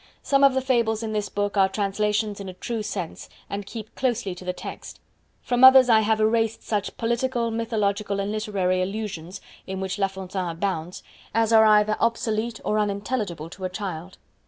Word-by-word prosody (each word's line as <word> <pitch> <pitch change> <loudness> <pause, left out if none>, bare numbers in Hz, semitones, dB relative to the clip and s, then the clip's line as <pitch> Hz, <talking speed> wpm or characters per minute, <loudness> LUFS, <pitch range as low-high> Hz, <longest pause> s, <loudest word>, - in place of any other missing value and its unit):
Some 275 0 +3
of 275 -1 +6
the 265 - +2
Fables 235 -4 +1
in 220 -1 -3
this 210 -1 -2
book 205 0 -2
are 190 -1 +5
translations 210 +1 -1
in 195 -1 -6
a 185 - -9
true 230 +3 -4
sense, 185 -5 -5 0.2
and 200 0 -4
keep 220 -1 -8
closely 240 -7 -1
to 180 - -11
the 180 - -1
text. 180 - -9 0.4
From 245 0 +1
others 260 -1 +9
I 225 -2 +7
have 220 0 +1
erased 225 0 +1
such 205 -2 -2
political, 235 0 0
mythological 210 -3 -1
and 200 +1 -2
literary 195 -4 0
allusions 195 -2 -5 0.3
(in 190 0 -4
which 190 +1 -3
La 195 - +3
Fontaine 190 -1 -5
abounds) 170 0 -3 0.3
as 225 0 +2
are 220 0 +7
either 215 0 +4
obsolete 230 0 -1
or 215 - +1
unintelligible 200 -5 -2
to 190 - -10
a - - -1
child. 185 -2 -6
210 Hz, 180 wpm, -24 LUFS, 190-225 Hz, 0.4 s, others